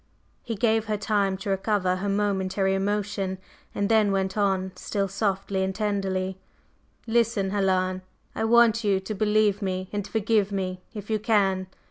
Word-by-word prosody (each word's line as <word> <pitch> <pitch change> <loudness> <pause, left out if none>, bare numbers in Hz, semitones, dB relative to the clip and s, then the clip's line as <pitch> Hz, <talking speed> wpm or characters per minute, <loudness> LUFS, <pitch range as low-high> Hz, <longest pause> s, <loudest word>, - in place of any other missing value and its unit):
He 230 - -4
gave 220 +1 +2
her 215 0 -1
time 200 -2 0
to 195 +1 -4
recover 190 -2 +1
her 200 +2 -2
momentary 195 -1 0
emotion 195 -1 -1 0.4
and 200 - 0
then 215 -2 +3
went 190 -1 0
on, 190 -2 +1
still 200 -2 -2
softly 195 -1 -1
and 190 0 -1
tenderly: 190 -3 -1 0.7
"Listen, 225 -4 +1
Helen. 185 -2 +1 0.3
I - - -1
want 230 0 +5
you 200 -2 +2
to 190 +3 -5
believe 210 0 +2
me 185 -1 -3
and 205 -1 -2
forgive 215 -1 +1
me, 185 -2 -3
if 210 +1 -6
you 215 - +1
can. 195 -4 +1
200 Hz, 155 wpm, -26 LUFS, 190-210 Hz, 0.7 s, want